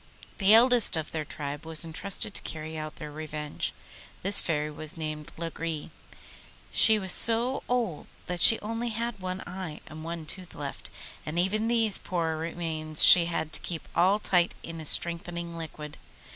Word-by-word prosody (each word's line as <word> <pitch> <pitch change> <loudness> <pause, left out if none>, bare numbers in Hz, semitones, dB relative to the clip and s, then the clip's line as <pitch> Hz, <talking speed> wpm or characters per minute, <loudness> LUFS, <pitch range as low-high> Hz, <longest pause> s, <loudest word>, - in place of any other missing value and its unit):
The 205 +2 +7
eldest 240 -5 +5
of 155 -2 -4
their 155 -1 -3
tribe 145 0 -6
was 160 0 +2
entrusted 200 +6 -2
to - - -6
carry 160 0 -5
out 155 -1 -6
their 150 -1 -8
revenge. 150 -1 -4 0.5
This 200 +2 +8
Fairy 150 -2 -1
was 155 +2 -3
named 155 -1 -5
Lagree; 165 -2 -5 0.8
she 220 -1 +5
was 190 -3 -1
so 235 +6 +3
old 230 -11 -1 0.2
that 180 -1 -4
she 225 - +7
only 230 +3 -3
had 230 -1 -4
one 185 0 -5
eye 180 -4 -7
and 155 0 -10
one 165 -1 -6
tooth 180 +3 -8
left, - - -7 0.3
and 155 +2 -5
even 210 +5 +1
these 225 -3 +2
poor 165 -3 -2
remains 160 -1 -3
she 175 -2 +10
had 160 -2 -3
to - - -2
keep 165 -3 -4
all 185 +5 +3
night 175 -1 +3
in 165 -1 -7
a - - -9
strengthening 170 0 0
liquid. 155 -2 -8
170 Hz, 170 wpm, -28 LUFS, 155-200 Hz, 0.8 s, she